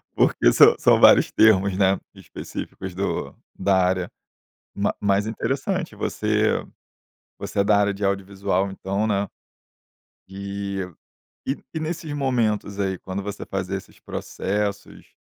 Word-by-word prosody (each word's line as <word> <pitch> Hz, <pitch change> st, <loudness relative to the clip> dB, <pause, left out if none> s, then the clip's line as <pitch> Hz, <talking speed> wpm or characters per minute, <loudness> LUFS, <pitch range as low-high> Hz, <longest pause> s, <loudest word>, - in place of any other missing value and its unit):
porque -, -, +3 dB
são -, -, +7 dB
são -, -, +5 dB
vários -, -, +7 dB
termos, 100 Hz, -3 st, +4 dB
né, 95 Hz, -1 st, +3 dB, 0.2 s
específicos 95 Hz, -1 st, -7 dB
do 95 Hz, +3 st, -3 dB, 0.2 s
da 95 Hz, +1 st, +2 dB
área, 90 Hz, -1 st, 0 dB, 0.6 s
mas 100 Hz, 0 st, 0 dB
mas 100 Hz, 0 st, +2 dB
interessante, 140 Hz, -, -2 dB
você 110 Hz, 0 st, 0 dB, 0.7 s
você -, -, -2 dB
é -, -, +3 dB
da 100 Hz, 0 st, +4 dB
área 100 Hz, 0 st, +2 dB
de 100 Hz, +1 st, -4 dB
audiovisual, 100 Hz, 0 st, 0 dB
então, 100 Hz, +2 st, -2 dB
né. 100 Hz, -2 st, 0 dB, 1.0 s
E 100 Hz, 0 st, -4 dB, 0.6 s
e 135 Hz, -, 0 dB, 0.2 s
e 160 Hz, -, -2 dB
nesses 160 Hz, -1 st, -4 dB
momentos 115 Hz, -7 st, 0 dB
aí, 95 Hz, -2 st, -1 dB
quando 95 Hz, +1 st, -5 dB
você 100 Hz, 0 st, -5 dB
fazia 95 Hz, 0 st, -3 dB
esses 95 Hz, -, -13 dB
processos, 100 Hz, +1 st, -4 dB
100 Hz, 130 wpm, -23 LUFS, 95-105 Hz, 1.0 s, são